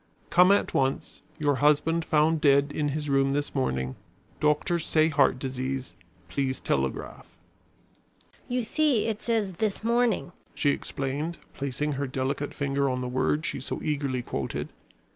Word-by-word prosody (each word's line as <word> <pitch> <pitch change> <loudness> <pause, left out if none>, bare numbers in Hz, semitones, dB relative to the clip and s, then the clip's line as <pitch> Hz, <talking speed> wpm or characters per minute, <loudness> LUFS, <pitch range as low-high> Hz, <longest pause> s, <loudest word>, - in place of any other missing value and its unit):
"Come 180 +2 +6
at 200 - +2
once. 135 0 -1 0.2
Your 145 -3 +1
husband 150 +3 +3
found 155 +1 +2
dead 140 -1 +4
in 150 -1 0
his 150 +1 -3
room 135 -1 +2
this 145 0 -2
morning. 65 - -1 0.4
Doctors 150 +3 +1
say 155 0 +3
heart 140 -4 +3
disease. 130 0 -4 0.3
Please 130 +8 -1
telegraph." 65 -1 -2 1.2
"You 250 0 -1
see 270 -1 +2
it 220 -2 -2
says 220 -4 0
this 215 -1 -1
morning," 235 -5 +1 0.2
she 145 - +2
explained, 140 +5 -3 0.2
placing 140 +2 -2
her 140 0 -2
delicate 135 +2 -2
finger 140 -1 0
on 125 0 -2
the 125 - -3
word 130 +5 0
she - - -2
so 135 - -4
eagerly 140 -5 -1
quoted. - - -4
145 Hz, 145 wpm, -27 LUFS, 135-165 Hz, 1.2 s, Come